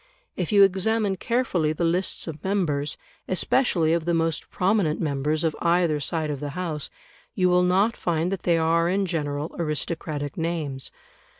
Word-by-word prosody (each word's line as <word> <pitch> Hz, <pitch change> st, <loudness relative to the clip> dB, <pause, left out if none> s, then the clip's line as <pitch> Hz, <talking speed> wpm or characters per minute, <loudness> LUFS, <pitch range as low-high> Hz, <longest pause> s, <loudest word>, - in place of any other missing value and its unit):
If 180 Hz, -4 st, -2 dB
you 200 Hz, -1 st, +7 dB
examine 195 Hz, +1 st, +2 dB
carefully 185 Hz, -10 st, 0 dB
the 165 Hz, -, -3 dB
lists 175 Hz, +3 st, +1 dB
of 155 Hz, -3 st, -7 dB
members, 165 Hz, -7 st, 0 dB, 0.3 s
especially 185 Hz, -4 st, +2 dB
of 170 Hz, -1 st, 0 dB
the 170 Hz, 0 st, +1 dB
most 165 Hz, -1 st, -1 dB
prominent 185 Hz, -5 st, +1 dB
members, 150 Hz, +1 st, 0 dB
of 160 Hz, -2 st, 0 dB
either 170 Hz, -3 st, +2 dB
side 155 Hz, +1 st, -1 dB
of 145 Hz, -, -4 dB
the 145 Hz, +1 st, -5 dB
House, 160 Hz, -5 st, -3 dB, 0.5 s
you 185 Hz, -3 st, +3 dB
will 180 Hz, 0 st, +4 dB
not 190 Hz, +5 st, +3 dB
find 170 Hz, +1 st, -1 dB
that 195 Hz, -, -3 dB
they 170 Hz, -1 st, +2 dB
are 165 Hz, +1 st, +2 dB
in 195 Hz, +2 st, +1 dB
general 150 Hz, -3 st, -3 dB
aristocratic 150 Hz, -2 st, -3 dB
names. 160 Hz, -5 st, -3 dB
170 Hz, 165 wpm, -25 LUFS, 155-185 Hz, 0.5 s, you